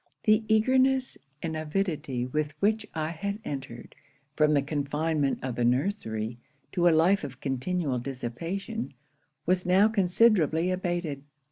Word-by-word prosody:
The 215 0 +4
eagerness 260 +4 +3 0.3
and 160 -1 -2
avidity 155 -6 -2
with 150 +3 -2
which 215 +4 +1
I 155 -1 -1
had 200 +4 -3
entered, 135 -4 -7 0.4
from 150 -1 +4
the 140 - +3
confinement 145 0 0
of 130 -1 -2
the 120 - +1
nursery, 120 - -1 0.3
to 175 -2 +2
a - - +8
life 170 +4 +4
of 135 -3 -7
continual 135 +1 -1
dissipation, 140 - -5 0.5
was 180 +1 +2
now 190 +4 +5
considerably 185 -4 +3
abated. 175 -6 -2
160 Hz, 130 wpm, -28 LUFS, 140-195 Hz, 0.5 s, a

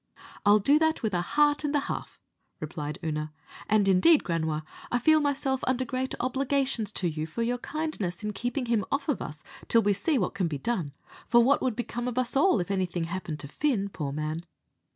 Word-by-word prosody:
"I'll 205 +1 +8
do 280 +9 +4
that 320 -3 +1
with 215 -3 0
a 175 - +1
heart 295 +10 +2
and 295 0 0
a 290 - +3
half," - - -5 0.4
replied 150 -1 -5
Oonagh; 155 -1 -2 0.4
"and, 210 -2 +3
indeed, 195 - +5
Granua, 160 -3 -1 0.3
I 245 - +3
feel 310 +6 +5
myself 275 -2 0
under 260 0 +1
great 260 +2 -2
obligations 260 -3 0
to 180 - 0
you 155 -1 -3
for 230 +9 -3
your 245 +1 -1
kindness 245 - -3
in 210 0 -2
keeping 245 +5 -2
him 230 -3 +1
off 280 0 -1
of 295 - 0
us 150 0 -7 0.2
till 230 -1 +4
we 205 0 +3
see 300 - 0
what 185 - 0
can 195 -3 0
be 150 -3 -3
done; 165 - -2 0.3
for 240 -1 +6
what 275 +4 +3
would 250 -4 0
become 240 0 -3
of 250 -1 -4
us 255 0 0
all 280 - +4
if 180 +2 -2
anything 185 -3 -1
happened 165 -4 -5
Fin, 225 - 0
poor 150 -7 -4
man." 155 +3 -3
225 Hz, 205 wpm, -28 LUFS, 175-265 Hz, 0.4 s, I'll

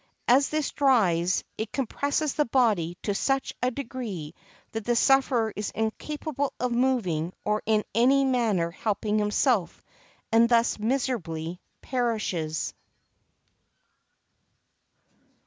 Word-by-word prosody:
As 265 +4 +5
this 305 -1 -1
dries, 185 -11 +2 0.2
it 220 -1 -3
compresses 285 +3 -1
the 300 - +1
body 210 -9 +1
to 205 - 0
such 270 +6 0
a 250 - +2
degree 230 - -6 0.4
that 225 -1 -4
the 240 +3 +1
sufferer 245 -4 +3
is 210 0 -3
incapable 285 +5 -3
of 250 -1 -1
moving 220 -10 0
or 210 0 +1
in 215 -1 +3
any 265 +5 +4
manner 220 -10 +1
helping 210 +2 -1
himself, 210 - +1 0.5
and 230 +1 +5
thus 235 -2 +3
miserably 200 -9 -2 0.2
perishes. 215 - -2
230 Hz, 110 wpm, -26 LUFS, 200-260 Hz, 0.5 s, As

